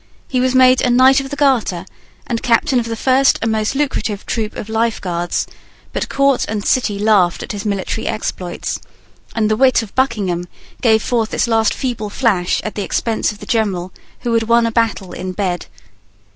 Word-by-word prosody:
He 255 - -1
was 255 0 +1
made 255 0 +6
a 250 - +2
Knight 260 +2 +5
of 270 0 -5
the 285 - -4
Garter 245 -11 +1 0.4
and 230 -1 -2
Captain 250 +2 +2
of 230 - -3
the 230 - -3
first 265 +3 +3
and 225 - +1
most 220 +3 -1
lucrative 265 -8 -2
troop 220 -2 -3
of 210 - -6
Life 225 +1 0
Guards: 175 -2 -2 0.5
but - - -2
Court 275 -1 +2
and 210 -1 -3
City 235 -6 +1
laughed 200 -4 +2
at - - -6
his 205 0 -5
military 200 +2 -2
exploits; 180 -4 -3 0.6
and 220 -2 +2
the 215 - +2
wit 255 -1 +3
of 210 - -11
Buckingham 200 -9 0 0.3
gave 220 -3 +3
forth 230 -3 -1
its - - +1
last 225 -2 +2
feeble 235 -5 -3
flash 200 -6 +1
at 215 - -4
the 205 - -4
expense 220 +3 -1
of 210 - -11
the - - -7
general 195 -6 -1 0.3
who 235 - -1
had 230 - +3
won 235 0 +4
a 230 - 0
battle 225 -5 0
in 185 +1 -5
bed. 180 -3 -2
225 Hz, 195 wpm, -18 LUFS, 205-250 Hz, 0.6 s, made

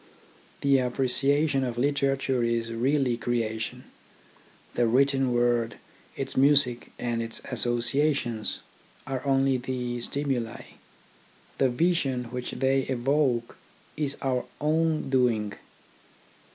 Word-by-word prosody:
The 140 -1 +4
appreciation 135 +3 +2
of 120 -2 -3
literature 135 -1 +1
is 115 0 -1
really 130 +1 +1
creation. 115 -2 -2 0.9
The 120 -1 +2
written 135 +2 +3
word, 120 -1 +1 0.4
its - - -4
music, 135 -3 +3
and 120 -1 -2
its 115 0 -4
associations, 120 0 0 0.4
are 130 -1 -4
only 135 -1 +2
the 125 -1 -3
stimuli. 125 -4 -2 1.0
The 135 - +4
vision 135 -2 +1
which 125 0 -4
they 135 +1 +1
evoke 130 -2 0 0.4
is 145 -2 -2
our 130 -2 0
own 155 -1 +1
doing. 115 -6 +2
130 Hz, 100 wpm, -27 LUFS, 120-140 Hz, 1.0 s, The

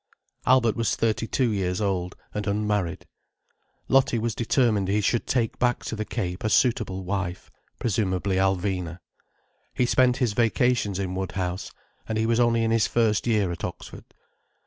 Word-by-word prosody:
Albert 125 -3 +4
was 115 -3 0
thirty 115 0 0
two 125 -1 +1
years 90 -3 -1
old, 95 -3 -1 0.2
and 105 0 -3
unmarried. 105 -3 -1 0.8
Lottie 135 -3 +3
was 115 0 -1
determined 115 -4 +1
he 100 +2 +2
should 110 +3 0
take 120 -4 0
back 120 -1 +1
to - - -3
the 110 0 -3
Cape 90 -6 -4
a 110 - +1
suitable 105 -5 +1
wife: 95 -1 -4 0.3
presumably 95 -4 0
Alvina. 95 -3 0 0.8
He 125 - +2
spent 125 0 +3
his 125 -5 +1
vacations 115 -2 +1
in 95 -2 -3
Woodhouse—and 95 +3 -5
he 110 - +1
was 115 +1 +2
only 115 -1 +3
in 115 - +1
his 115 -1 +3
first 115 -1 +1
year 105 -6 +2
at 85 - -7
Oxford. - - -7
105 Hz, 155 wpm, -25 LUFS, 95-115 Hz, 0.8 s, Albert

